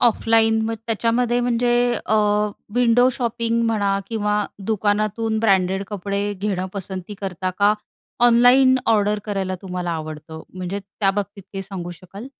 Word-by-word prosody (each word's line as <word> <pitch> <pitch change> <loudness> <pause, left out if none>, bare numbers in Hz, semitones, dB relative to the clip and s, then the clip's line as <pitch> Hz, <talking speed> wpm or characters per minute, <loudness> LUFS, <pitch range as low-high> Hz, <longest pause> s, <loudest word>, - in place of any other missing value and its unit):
Offline 225 -1 +3
मग 225 - -1
त्याच्यामध्ये 235 +2 +1
म्हणजे 245 0 +1 0.4
अ, 220 - +1 0.6
विंडो 245 0 +4
शॉपिंग 235 -1 -1
म्हणा 205 -3 +1
किंवा 210 -2 0 0.3
दुकानातून 215 +1 0
ब्रँडेड 195 -2 +2
कपडे 200 0 -3
घेणं 190 -1 -2
पसंती 190 0 -6
करता 185 -1 -3
का, 205 +1 +5 0.5
ऑनलाईन 250 +2 +6
ऑर्डर 210 -2 +2
करायला 195 -3 -2
तुम्हाला 180 -2 -4
आवडतं 155 0 -6
म्हणजे 185 +2 -4
त्या 195 0 -1
बाबतीत 200 0 -4
काही 195 -1 -4
सांगू 180 -2 -6
शकाल? 190 +6 -10
205 Hz, 130 wpm, -21 LUFS, 190-230 Hz, 0.6 s, ऑनलाईन